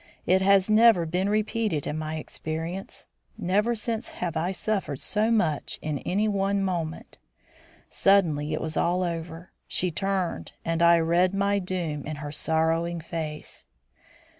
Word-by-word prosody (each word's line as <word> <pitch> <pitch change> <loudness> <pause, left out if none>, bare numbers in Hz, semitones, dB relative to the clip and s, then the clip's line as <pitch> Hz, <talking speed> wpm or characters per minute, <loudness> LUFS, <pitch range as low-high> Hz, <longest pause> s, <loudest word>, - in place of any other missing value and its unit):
It 190 +1 +3
has 195 0 +4
never 215 -4 +5
been 180 +4 0
repeated 215 -6 0
in 150 - -3
my 155 0 -3
experience. 160 +4 -5 0.3
Never 210 +4 +1
since 225 +1 -2
have 170 -2 -4
I 170 +4 0
suffered 195 -8 -2
so 215 +1 +1
much 180 -10 0
in 150 -2 -3
any 205 +4 0
one 200 -1 +1
moment. 170 -4 -4 0.7
Suddenly 160 -7 +3
it 155 - -2
was 160 -1 -4
all 180 +2 +1
over. 165 0 -5 0.2
She 180 -1 -1
turned 185 - -2
and 165 0 0
I 170 0 +7
read 170 +3 +2
my 200 +1 +2
doom 175 -6 -3
in 155 - -4
her 145 0 -6
sorrowing 165 +2 0
face. 155 - -6
175 Hz, 145 wpm, -26 LUFS, 160-195 Hz, 0.7 s, I